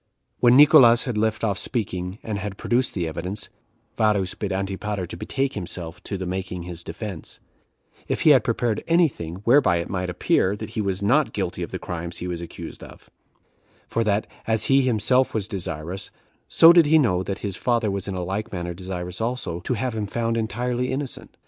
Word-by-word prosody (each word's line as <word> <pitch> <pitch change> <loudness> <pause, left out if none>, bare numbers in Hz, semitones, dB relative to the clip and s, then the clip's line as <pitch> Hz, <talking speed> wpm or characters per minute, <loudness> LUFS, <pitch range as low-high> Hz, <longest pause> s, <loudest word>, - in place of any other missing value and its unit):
When 120 +1 +6
Nicolaus 120 -5 +7
had 125 -4 -3
left 110 +1 0
off 100 -4 0
speaking, 95 -5 -3
and 105 -2 -3
had 100 -1 -5
produced 125 +2 0
the 85 -4 -1
evidence, 90 +6 -5 0.5
Varus 105 -4 +2
bid 100 -2 -4
Antipater 95 0 -3
to - - -8
betake 135 +9 -2
himself 85 -4 -6
to 100 - -3
the 95 - -4
making 90 -1 -4
his 85 -1 -6
defense, 90 0 -7 0.7
if - - -1
he 155 - +6
had 130 -6 +6
prepared 115 -2 -1
any 170 0 +5
thing 85 - -8
whereby 125 -4 +5
it 85 - -4
might 90 -1 -2
appear 95 +2 +1
that - - -7
he 110 - -2
was 100 -1 -2
not 100 - +3
guilty - - -3
of - - -3
the - - -4
crimes 85 0 -5
he 90 - -5
was 85 -1 -4
accused 85 - -8
of; - - -14 0.8
for 115 - 0
that, 105 -1 +1 0.2
as 110 -1 +3
he 135 - +4
was 135 - +3
himself 125 +3 +2
desirous, 90 -2 -4 0.4
so 165 +1 +8
did 170 -3 +6
he 160 +2 +6
know 105 -12 +2
that 100 +2 -4
his 100 -3 -3
father 115 -3 0
was 100 0 -3
in 100 - -3
like 95 +4 -3
manner 85 -2 -4
desirous 90 +1 -6
also, 115 -7 -2
to 120 +8 -2
have 120 +2 -2
him 105 -2 -2
found 115 +2 -1
entirely 120 +3 -1
innocent. 135 0 -4
100 Hz, 195 wpm, -24 LUFS, 90-120 Hz, 0.8 s, so